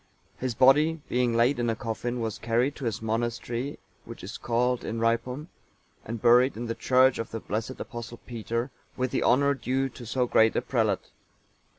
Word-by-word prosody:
(890) - - -25
His 120 - -3
body, 150 +6 +5
being 125 -1 +1
laid 120 +3 +3
in 120 -1 +1
a 115 - 0
coffin, 120 +2 -3
was 110 -2 -3
carried 120 +5 +1
to 140 - -5
his 110 -1 -2
monastery, 120 +4 -2 0.3
which - - -10
is - - -7
called 125 +1 +1
Inhrypum,(891) 115 +6 -1 0.6
and 115 +1 -5
buried 125 +1 +5
in 120 - -4
the 115 - -2
church 130 +2 +3
of 115 - -3
the 115 - -5
blessed 110 +5 -4
Apostle 120 -1 -7
Peter, 115 +2 -3 0.3
with 130 -1 -1
the - - 0
honour 140 +3 +4
due 130 +1 -1
to 120 -1 -11
so 125 +2 +1
great 110 -2 +4
a - - +2
prelate. - - 0
120 Hz, 185 wpm, -27 LUFS, 115-130 Hz, 0.6 s, body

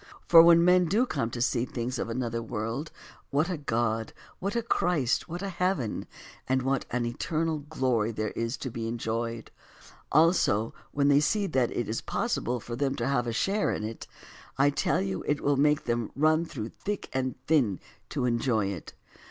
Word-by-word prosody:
For 165 -1 +10
when 170 0 +7
men 180 0 +5
do 210 +9 +2
come 115 - -2
to 120 0 -2
see 120 -1 +1
the - - -7
things 125 0 -3
of - - -2
another 115 -1 -2
world, 115 +7 -4 0.4
what 155 +6 +1
a 175 - -2
God, 115 -4 -1 0.3
what 200 +3 -3
a 235 - 0
Christ, 170 - +1
what 175 +4 -5
a 200 - -2
heaven, 180 - -1 0.4
and 130 0 +2
what 135 0 0
an 125 0 -1
eternal 155 +6 -1
glory 130 -7 0
there 110 -1 -3
is 115 +2 -3
to 130 - -5
be 115 0 -4
enjoyed; 115 0 -3 0.6
also, 150 - +3 0.2
when 140 -1 +1
they 140 0 +6
see 200 +8 +1
that 130 -9 +1
it 120 - -3
is 110 - -2
possible 125 +1 -1
for 120 +1 -6
them 135 +1 0
to 115 - -2
have 125 -3 +1
a - - 0
share 195 - +1
in - - -3
it, 110 +1 -6 0.5
I 140 +2 +4
tell 140 - +1
you 95 -1 -3
it 145 0 +1
will 145 0 +2
make 150 +2 +3
them 120 -2 -1
run 155 +3 +3
through 115 -8 -6
thick 205 - -5
and 130 -1 -1
thin 130 - +2 0.3
to - - -1
enjoy 115 -4 +1
it. 95 -5 -7
130 Hz, 195 wpm, -28 LUFS, 115-155 Hz, 0.6 s, For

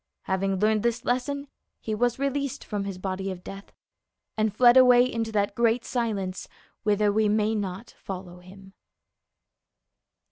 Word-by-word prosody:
Having 190 0 -1
learned 215 +2 +2
this 235 +1 -1
lesson, 280 +3 -1 0.3
he 220 - -4
was 240 +2 +1
released 275 0 -2
from 205 -2 -4
his 195 -2 -5
body 190 +1 -3
of 180 -1 -7
death 195 +1 -10 0.6
and 215 0 +1
fled 240 +4 +5
away 250 -1 +7
into 230 -3 -3
that 205 -2 0
great 235 +1 +1
silence 205 -7 -3 0.3
whither 210 0 +2
avc 215 0 +2
may 215 +1 +1
not 200 +1 -4
follow 180 -2 -8
him. 190 +2 -15
215 Hz, 145 wpm, -26 LUFS, 195-240 Hz, 0.6 s, away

